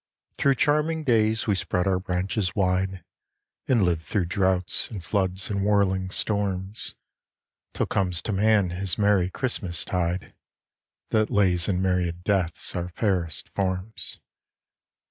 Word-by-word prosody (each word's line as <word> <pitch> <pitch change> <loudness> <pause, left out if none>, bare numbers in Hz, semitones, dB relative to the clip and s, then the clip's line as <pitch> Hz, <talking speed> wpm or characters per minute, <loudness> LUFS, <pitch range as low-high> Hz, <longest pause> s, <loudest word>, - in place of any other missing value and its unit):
Through 140 -1 +4
charming 150 +4 +1
days 110 -4 +2
we 105 - +2
spread 90 -1 -1
our 95 -1 +2
branches 90 +1 -1
wide, 95 -1 0 0.6
And 120 -5 +3
live 85 -3 +1
through 85 +4 -1
drouths, 95 0 0
and 100 -7 -7
floods, 95 0 -1
and 100 -1 0
whirling 95 -2 +2
storms, 100 0 -1 0.8
Till - - +1
comes 90 -3 -1
to - - -2
man 100 -2 +3
his 95 +1 -1
merry 100 -3 +3
Christmas 95 -7 -2
tide, 90 0 -2 0.8
That 110 -1 +2
lays 90 -4 +2
in 95 -1 +1
myriad 90 -2 0
deaths 90 -5 0
our 90 0 -2
fairest 90 -5 -1
forms. 95 +2 -3
95 Hz, 130 wpm, -25 LUFS, 90-105 Hz, 0.8 s, Through